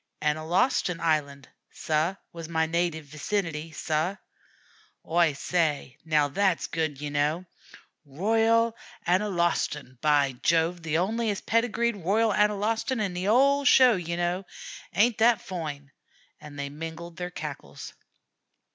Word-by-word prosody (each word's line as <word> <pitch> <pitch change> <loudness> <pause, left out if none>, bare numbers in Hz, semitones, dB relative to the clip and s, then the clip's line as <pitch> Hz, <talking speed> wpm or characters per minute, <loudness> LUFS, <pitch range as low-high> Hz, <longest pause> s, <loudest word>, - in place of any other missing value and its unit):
"Analostan 160 - +1
Island, 145 -4 -1 0.2
sah, 160 +4 -1 0.2
was 165 -1 -8
my 160 -1 +1
native 165 -1 -1
vicinity, 160 +1 -3
sah." 160 +4 -1 0.9
"Oi 165 -2 +3
say, 150 -4 -1
now, 155 -2 +2
that's 185 +4 +1
good, 155 -4 -2
ye 145 0 -5
kneow. 150 +5 0 0.6
'Royal 225 +9 +2 0.3
Analostan,' 175 - 0
by 145 -3 +3
Jove! 170 +1 +2
The 160 -1 -2
onliest 210 +4 -1
pedigreed 230 0 +1
'Royal 205 +5 +1
Analostan' 210 +5 +1
in 200 -4 -1
the 180 +2 -3
'ole 275 +5 +4
sheow, 255 -3 +6
ye 170 -2 -3
kneow. 175 +2 -1 0.5
Ain't 225 +4 +3
that 230 -1 +5
foine?" 150 -6 -6 0.5
and 150 -1 -11
they 140 0 -4
mingled 165 +2 -8
their 180 0 -4
cackles. 140 - -8
170 Hz, 120 wpm, -27 LUFS, 155-205 Hz, 0.9 s, sheow